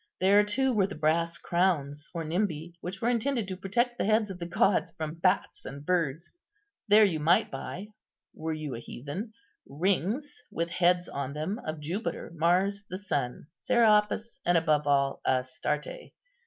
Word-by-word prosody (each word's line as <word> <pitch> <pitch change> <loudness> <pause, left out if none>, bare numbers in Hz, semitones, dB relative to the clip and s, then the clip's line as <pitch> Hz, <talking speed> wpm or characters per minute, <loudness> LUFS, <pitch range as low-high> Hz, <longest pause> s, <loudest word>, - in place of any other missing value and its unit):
There, 200 +3 +5
too, 260 +6 +1
were 200 -4 +3
the 200 - -7
brass 165 +2 +1
crowns, 150 -5 0
or 170 -2 -4
nimbi 170 -1 -2
which 190 +4 -6
were 235 - +3
intended 240 -2 0
to 190 - -4
protect 240 +6 0
the - - +1
heads 215 -1 +2
of 185 - -8
the 170 - -4
gods 185 +3 +2
from 155 -1 -5
bats 185 +3 +1
and 140 +2 -8
birds. 170 - -1 0.5
There 210 +1 +7
you 170 -6 0
might 165 +4 +3
buy, 135 +9 -6 0.4
were 160 0 -4
you 155 -3 -4
a 115 - -5
heathen, 150 - -7 0.3
rings 200 - -1
with 170 0 -2
heads 180 0 +2
on 140 0 -4
them 160 +9 -3
of 155 0 -3
Jupiter, 170 +5 -4
Mars, 185 +5 +2
the 185 - -4
Sun, 145 -12 -3
Serapis, 215 +1 +2
and 175 -1 +3
above 150 -3 +2
all 140 -1 +2
Astarte. 140 - -2
175 Hz, 165 wpm, -29 LUFS, 155-205 Hz, 0.5 s, There